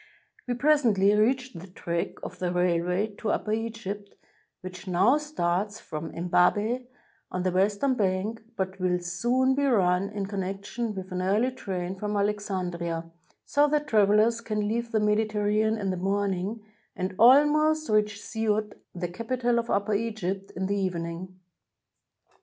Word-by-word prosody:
We 245 - 0
pres 295 +4 +4
ently 205 -4 +3
reached 250 +1 +1
the 185 - -10
track 170 -2 -3
of 180 - -7
the 180 -1 -1
railway 180 +3 +1
to 220 - -2
Upper 210 - -1
Egypt, 220 -3 -5 0.5
which 185 +1 -9
now 195 +11 +4
starts 205 - -1
from 155 +1 -6
Embabeh, 205 +8 +1 0.4
on 180 0 -2
the 185 - +1
western 200 +8 +2
bank, 205 0 -1
but 190 -1 -3
will 180 -1 +1
soon 240 +10 +1
be 280 +1 0
run 195 -7 +2
in 205 -2 -3
connection 200 +3 -4
with 190 0 -7
an 180 0 -2
early 210 +7 +2
train 185 -7 -4
from 210 0 -2
Alexandria, 180 -5 -2 0.3
so 290 +1 +3
that 295 0 +1
travelers 215 -1 +3
can 215 -2 -2
leave 235 +2 -2
the 220 - +2
Medi 210 +1 +2
terranean 215 +1 +1
LQ 195 -3 -1
the 185 - -3
morning 200 +2 -1 0.3
and 185 +1 -3
almost 300 +5 +5
reach 210 -1 +1
Siout, 215 -1 -1 0.2
the 175 0 -2
capital 235 +5 -1
of 235 0 -4
Upper 200 +1 +1
Egypt, 200 -3 -2
in 190 - -2
the 200 +1 0
evening. 180 0 -4
205 Hz, 155 wpm, -27 LUFS, 185-230 Hz, 0.5 s, almost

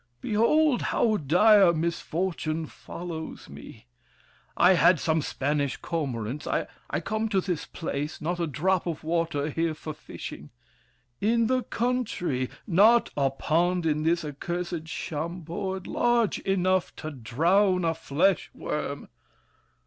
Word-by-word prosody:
Behold, 245 - +3
how 220 -2 +1
dire 190 +4 +5
misfortune 165 0 -2
follows 165 +1 -8
me! - - -12 0.7
I 180 +2 +6
had 175 -2 +5
some 160 +1 +1
Spanish 145 0 -1
cormorants. 135 -5 -3
I - - 0 0.4
come 220 0 -1
To 195 -3 +2
this 180 -4 -3
place—not 160 +2 -4
a 170 - 0
drop 180 +5 0
of 160 -2 -4
water 160 -2 -1
here 165 +1 -1
For 155 0 -6
fishing! 150 - -9 0.7
In 230 +2 +2
the 255 +2 +2
country! 220 - -1 0.2
Not 220 +5 +5
a 140 -2 +2
pond 170 +6 0
In 155 -1 +1
this 165 +1 +1
accursed 170 +3 -4
Chambord 170 +4 -4
large 240 -3 +1
enough 185 -1 +1
To 155 - -6
drown 170 - +2
a 165 - +2
flesh 165 +3 +1
worm! - - -4
170 Hz, 120 wpm, -27 LUFS, 155-195 Hz, 0.7 s, I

